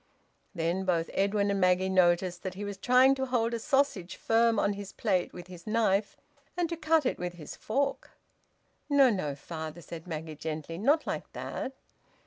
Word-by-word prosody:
Then 170 +3 0
both 170 -3 0
Edwin 200 +1 +1
and 200 -1 0
Maggie 185 +1 +3
noticed 180 -1 +2
that 185 -2 -5
he 205 +2 -5
was 205 -1 -5
trying 250 +5 +5
to 265 -1 -2
hold 235 -2 +1
a 235 - -1
sausage 265 - 0
firm 230 0 +2
on 205 - +2
his 200 -1 -7
plate 190 -5 0
with 175 - -9
his 180 0 -12
knife, 215 -2 +1 0.4
and 350 -1 +1
to 335 - -2
cut 320 -2 +2
it - - 0
with 175 0 -3
his 165 -4 -9
fork. 275 +6 -1 0.8
"No, 275 -3 +6
no, 150 -9 -2
father!" 160 +2 -7
said 165 +2 -9
Maggie 160 -1 -5
gently. 155 +2 -5
"Not 290 +9 +3
like - - -4
that!" 265 - -5
195 Hz, 180 wpm, -29 LUFS, 175-235 Hz, 0.8 s, No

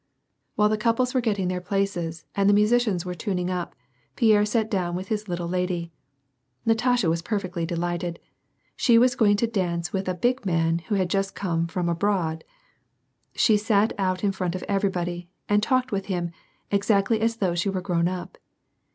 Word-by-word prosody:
While 210 0 +3
the 215 0 0
couples 235 +3 +1
were 255 - +2
getting 205 -5 0
their 180 0 -2
places, 180 -4 -2
and 200 0 +2
the 205 - +5
musi 210 +4 +4
cians 180 -2 -2
were 180 - -3
tuning 180 +1 -2
up, 180 -1 -4 0.4
Pierre 215 -3 +4
sat 220 0 0
down 180 -4 -1
with 185 +1 -5
his 215 -1 -2
little 175 -1 -3
lady. 180 -1 -2 0.7
Natasha 235 -2 +2
was 165 +1 +1
perfectly 180 -3 -3
delighted; 175 0 -2 0.6
she 235 -3 +4
was 250 +2 +5
going 215 -5 +4
to 235 - +2
dance 175 -6 -2
with 190 -1 -1
a 185 - -1
big 245 +8 0
man, 165 -3 +1
who 205 +5 -3
had 190 -2 +1
just 195 +2 -1
come 170 -3 -1
from 175 +1 -2
abroad. 170 -2 0 0.9
She 215 -3 +4
sat 210 0 +2
out 185 -1 0
in 200 - +3
front 185 -2 -3
of 185 - -5
everybody, 180 -3 -2 0.2
and 205 0 +3
talked 255 +3 +1
with 195 -1 -2
him, 175 -3 -2 0.4
exactly 200 +2 +2
as 230 +1 +1
though 190 -6 0
she 175 +3 0
were 190 -1 -1
grown 175 -2 0
up. 180 0 -6
190 Hz, 185 wpm, -25 LUFS, 175-210 Hz, 0.9 s, the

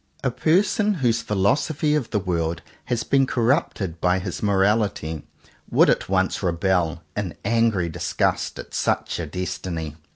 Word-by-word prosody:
A 125 - +1
person 205 - +2
whose 120 -7 +1
philosophy 140 +9 +1
of 150 -6 0
the 105 - 0
world 85 -4 -1 0.2
has 120 -1 -1
been 135 -1 +2
corrupted 115 - 0
by 90 +1 +3
his 95 - -5
morality, 100 -6 +1 0.4
would - - +5
at - - -1
once - - +1
rebel, 85 -2 0
in 95 -7 -3
angry 115 -6 +2
disgust, 80 - -1
at - - -9
such - - -1
a - - -3
destiny. 85 -4 -4
100 Hz, 140 wpm, -23 LUFS, 85-125 Hz, 0.4 s, would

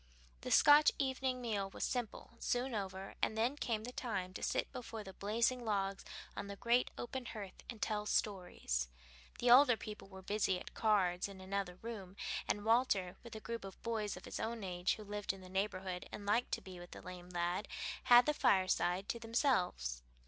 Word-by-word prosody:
The - - -5
Scotch 295 +1 +8
evening 260 -2 0
meal 205 -5 -1
was - - -5
simple, 245 -4 -3
soon 245 +1 0
over, 195 -2 -4
and 220 - +1
then 240 +5 +2
came 225 -6 -1
the 245 - -5
time 195 -8 -3
to - - -6
sit - - 0
before 225 -3 -6
the 190 -1 -9
blazing 230 +6 +1
logs 195 -3 -1 0.3
on 200 - -4
the 200 - -5
great 235 +4 +2
open 245 0 -4
hearth 200 -4 -7
and 230 - -6
tell 210 -1 -1
stories. 180 - 0 0.5
The 240 0 +3
older 250 -2 +8
people 210 -3 -8
were 190 -1 -10
busy 195 -2 +1
at - - -10
cards 190 -5 +2
in 195 -1 -10
another 190 -1 -3
room, 200 -5 -6 0.3
and 205 0 -1
Walter, 220 -6 +3
with 235 -2 -9
a - - -5
group 230 0 -5
of 195 -1 -9
boys 220 -3 -1
of - - -10
his - - -5
own 225 -1 -3
age 180 -1 0
who 215 - -9
lived 205 -1 -2
in 195 - -11
the 185 - -11
neighborhood 190 -1 -2
and 205 - -7
liked 230 +4 +2
to - - 0
be 185 -2 -10
with 175 0 -10
the - - -9
lame 180 -1 -9
lad, 175 +3 -1 0.4
had 245 0 +9
the 300 - +3
fireside 185 - +2
to 235 - -1
themselves. 225 - +1
205 Hz, 195 wpm, -36 LUFS, 190-235 Hz, 0.5 s, had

